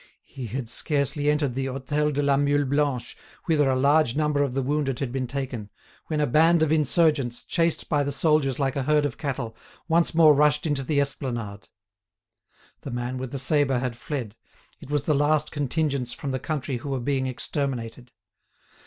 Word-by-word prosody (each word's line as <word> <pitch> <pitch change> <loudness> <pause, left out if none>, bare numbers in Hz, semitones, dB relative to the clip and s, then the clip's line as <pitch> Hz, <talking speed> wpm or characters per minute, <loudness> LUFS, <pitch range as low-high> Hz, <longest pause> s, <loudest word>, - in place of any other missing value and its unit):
He 130 -3 -8
had 120 +2 -4
scarcely 145 +3 0
entered 150 -3 +1
the 135 +1 -2
Hôtel 140 +3 -1
de 145 0 -1
la 140 -1 +3
Mule 145 +1 +2
Blanche, 140 -2 -1 0.3
whither 150 -4 +2
a 130 - +2
large 140 -1 +3
number 150 -1 +1
of 135 -3 -1
the 135 - 0
wounded 140 -1 -1
had 135 -4 -3
been 130 -1 -2
taken, 125 -5 -5 0.4
when 155 -2 -1
a 150 - +3
band 160 +5 +4
of 155 - +1
insurgents, 150 -5 +2
chased 165 -1 0
by 145 -3 +1
the 140 0 -1
soldiers 140 -2 +2
like 135 -2 -1
a 140 - 0
herd 150 +2 +2
of 140 - -4
cattle, 135 -6 -4 0.3
once 170 0 +2
more 160 -2 +7
rushed 150 +1 +3
into 145 -3 0
the 140 +2 0
esplanade. 120 -7 -4 1.1
The - - -8
man 120 +1 -3
with 130 -1 -5
the 140 - -3
sabre 135 0 +2
had 125 -1 -2
fled; 120 -3 -5 0.4
it - - -12
was 145 -2 0
the 155 - +1
last 150 +1 +1
contingents 140 -3 -1
from 145 -4 -5
the 130 - -2
country 140 -4 -3
who 140 +4 -7
were 135 -1 -1
being 130 +1 -1
exterminated. 125 -2 -4
140 Hz, 190 wpm, -25 LUFS, 130-150 Hz, 1.1 s, more